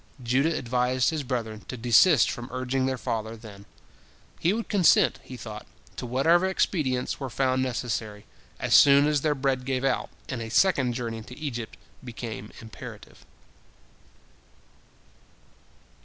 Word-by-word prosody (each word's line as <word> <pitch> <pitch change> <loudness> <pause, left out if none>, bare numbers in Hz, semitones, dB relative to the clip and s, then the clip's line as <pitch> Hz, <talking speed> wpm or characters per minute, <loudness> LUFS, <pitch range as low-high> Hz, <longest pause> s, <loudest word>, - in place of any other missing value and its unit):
" 130 - -15
Judah 135 +7 +1
advised 125 +1 +1
his 155 -2 -2
brethren 115 -5 -4
to 130 - -6
desist 125 +8 +5
from 120 0 -7
urging 130 +1 -1
their 130 -1 -1
father 110 -1 -4
then; 100 -3 -13 0.7
he 170 - +2
would 225 +2 -2
consent, 190 -6 +4
he 130 - -10
thought, 110 -2 -9 0.3
to 125 - -5
whatever 165 +9 +3
expedients 145 -9 -1
were 135 -2 -4
found 130 +1 0
necessary, 115 -4 -3 0.3
as - - -1
soon 140 0 +7
as 150 -1 +1
their 150 0 +1
bread 135 -2 -1
gave 130 0 -2
out, 135 - 0 0.2
and 130 -3 -4
a 115 - -5
second 135 -3 +3
journey 115 -2 -4
to 125 +3 -12
Egypt 120 -7 -5 0.3
became 115 -3 -7
imperative. 110 -1 -11
125 Hz, 140 wpm, -26 LUFS, 115-140 Hz, 0.7 s, soon